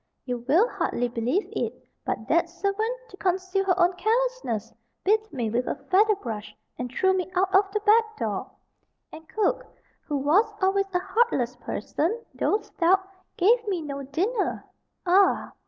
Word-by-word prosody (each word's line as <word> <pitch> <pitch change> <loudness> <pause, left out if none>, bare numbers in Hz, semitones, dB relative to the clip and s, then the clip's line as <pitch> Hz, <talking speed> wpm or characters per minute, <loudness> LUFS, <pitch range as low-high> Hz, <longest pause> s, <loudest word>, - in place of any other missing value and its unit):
You 250 -2 -2
will 345 - +5
hardly 245 - -1
believe 245 - -1
it, - - -2 0.3
but 220 - -3
that 340 +1 +2
servant, 400 +7 -1
to 385 - -13
conceal 375 +1 0
her 370 -2 +2
own 350 +1 +4
carelessness, 455 - -1 0.3
beat 435 +2 +2
me 235 -5 -2
with 245 +2 0
a - - -1 0.2
feather 420 +3 +5
brush, 215 - -6 0.2
and 250 -1 -5
threw 380 +8 +2
me 370 0 -2
out 380 +1 +1
of 390 +1 +5
the 425 +1 -1
back 440 +1 +3
door; - - -3 0.6
and 320 0 -12
cook, 430 - 0 0.4
who 295 - -1
was 335 +11 +3
always 390 +1 +2
a - - +6
heartless 375 - +1
person, 325 - -2
though 420 - +1
stout, 380 +3 +1 0.3
gave 455 +5 +3
me 365 -5 -1
no 280 -2 -5
dinner. 375 - -1 0.4
Ah! 375 +2 +3
375 Hz, 160 wpm, -26 LUFS, 285-420 Hz, 0.6 s, a